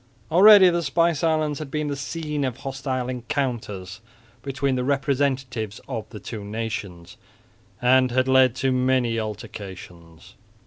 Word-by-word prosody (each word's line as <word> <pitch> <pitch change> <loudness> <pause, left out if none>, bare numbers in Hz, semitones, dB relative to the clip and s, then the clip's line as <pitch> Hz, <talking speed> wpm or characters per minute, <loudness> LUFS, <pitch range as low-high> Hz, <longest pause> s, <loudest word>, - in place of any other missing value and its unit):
Already 190 +1 +8
the 170 0 0
spice 165 +1 +1
islands 155 -3 +1
had 155 -3 -6
been 150 +1 -2
the 145 - -2
scene 150 +1 -4
of 130 -2 -2
hostile 135 -2 -4
encounters 120 -7 -4 0.4
between 135 0 -1
the 125 -1 -1
representatives 135 -5 -1
of 115 -5 -5
the 105 - -9
two 105 +1 -7
nations, 100 -5 -6 0.7
and 130 +1 +4
had 130 +1 +1
led 130 -2 +4
to 130 +1 0
many 125 -2 +1
altercations. 95 -6 -9
130 Hz, 135 wpm, -23 LUFS, 115-140 Hz, 0.7 s, Already